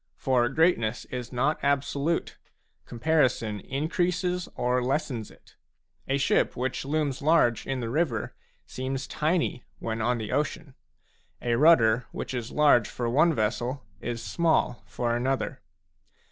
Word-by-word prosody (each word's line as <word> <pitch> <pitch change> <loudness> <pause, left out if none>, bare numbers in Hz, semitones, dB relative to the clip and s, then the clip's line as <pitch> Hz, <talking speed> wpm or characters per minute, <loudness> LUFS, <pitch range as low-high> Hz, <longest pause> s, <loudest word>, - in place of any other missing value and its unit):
For 125 -4 +1
greatness 135 -7 +1
is 125 -2 -5
not 135 +5 0
absolute; 140 +3 0 0.5
comparison 120 -5 +1
increases 180 - -1
it - - -19
or 125 +1 +1
lessens 125 -4 -2
it. - - -21 0.5
A 135 - +1
ship 140 0 +1
which 130 +1 -2
looms 145 -2 -1
large 140 -6 +3
in 135 -1 -2
the 115 - -3
river 140 -7 -1 0.3
seems 130 +1 -4
tiny 155 -5 -1
when 110 0 -3
on 120 +2 +1
the 110 -2 -5
ocean. 150 +1 -2 0.7
A 120 - -1
rudder 120 -5 +5
which - - -5
is 120 -2 -4
large 145 -6 +4
for 120 - -3
one 160 +5 +4
vessel, 120 +4 -1 0.2
is 120 -1 -4
small 165 -8 +1
for 120 +6 -1
another. 130 +2 -1
130 Hz, 135 wpm, -27 LUFS, 120-150 Hz, 0.7 s, rudder